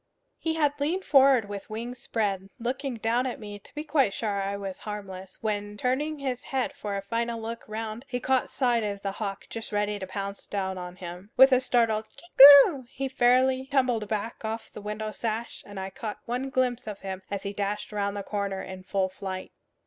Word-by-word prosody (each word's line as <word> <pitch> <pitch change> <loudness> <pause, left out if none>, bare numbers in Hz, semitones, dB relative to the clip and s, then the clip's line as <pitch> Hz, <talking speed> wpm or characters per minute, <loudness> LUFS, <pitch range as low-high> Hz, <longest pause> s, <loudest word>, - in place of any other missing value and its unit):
He 320 -1 -1
had 295 -2 +1
leaned 345 +7 0
forward 270 -5 +5
with 200 -1 -7
wings 235 +3 -5
spread, 195 -4 -2
looking 255 +2 -2
down 230 +3 +1
at 245 - -4
me 205 -1 -8
to 200 - -19
be 300 - -3
quite 280 -10 +2
sure 205 -3 -1
I 200 +1 -2
was 195 -2 -6
harmless, 190 -3 -7
when, 205 -1 -2
turning 285 +7 0
his 260 -3 -3
head 265 +1 -1
for 210 -8 -4
a 195 - -4
final 230 +2 -2
look 230 +1 -5
round, 220 +3 -5
he 245 -1 -2
caught 260 0 +1
sight 245 -3 +2
of 200 -1 -3
the 195 - -1
hawk 195 -1 -5
just 225 -1 -6
ready 205 0 0
to 190 - -5
pounce 200 +1 -5
down 190 -2 -2
on 180 0 -7
him. 180 +2 -8
With 265 +1 +9
a 255 0 +5
startled 225 -4 +2
kee 345 -6 +8 0.3
uk 265 -5 -9
he 270 +1 -3
fairly 260 +1 +3
tumbled 255 -6 +1
back 220 +2 -3
off 220 +1 -4
the - - -8
window 210 +1 -4
sash, 225 +1 -4
and 205 -1 -7
I 190 0 -5
caught 210 +1 -5
one 250 +3 -2
glimpse 250 -3 0
of 210 -2 -6
him 190 -1 -5
as 200 -1 -3
he 200 0 -3
dashed 205 +1 -3
round 200 -1 -1
the 200 - -3
corner 200 -2 -3
in 185 0 -8
full 190 0 0
flight. 190 0 -6
220 Hz, 210 wpm, -27 LUFS, 200-255 Hz, 0.3 s, With